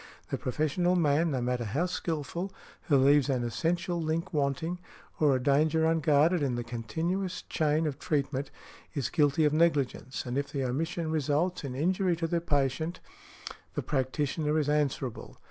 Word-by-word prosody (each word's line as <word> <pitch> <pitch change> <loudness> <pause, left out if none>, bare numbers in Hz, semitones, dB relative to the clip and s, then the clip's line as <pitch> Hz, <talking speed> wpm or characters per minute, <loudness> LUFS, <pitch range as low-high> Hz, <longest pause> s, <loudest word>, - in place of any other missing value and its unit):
The - - 0
professional 155 +7 +1
man, 160 -1 +3
no 130 -4 -1
matter 125 0 -1
how 135 - 0
skilful, 170 +1 -3 0.4
who 145 - +5
leaves 140 +1 +4
an 130 -3 +1
essential 170 - -1
link 165 +3 -2
wanting, 150 +4 -1 0.4
or 145 -3 +4
a - - +1
danger 155 +3 +3
unguarded 160 +1 +3
in 135 -4 0
the 120 - -2
continuous 165 +11 -3
chain 155 +1 +1
of 145 -2 -3
treatment, 140 -3 -1 0.5
is 140 -4 -1
guilty 150 -1 +3
of 150 - +2
negligence, 145 -5 +1
and 125 +2 -1
if 140 0 -4
the 140 -2 -2
omission 160 +6 -2
results 155 +4 0
in 130 -3 -4
injury 180 +4 +1
to 165 0 -2
the 170 +1 0
patient, 150 +2 0 0.8
the - - -2
practitioner 150 +3 0
is 150 -2 +1
answerable. 140 -5 -1
150 Hz, 160 wpm, -29 LUFS, 135-165 Hz, 0.8 s, who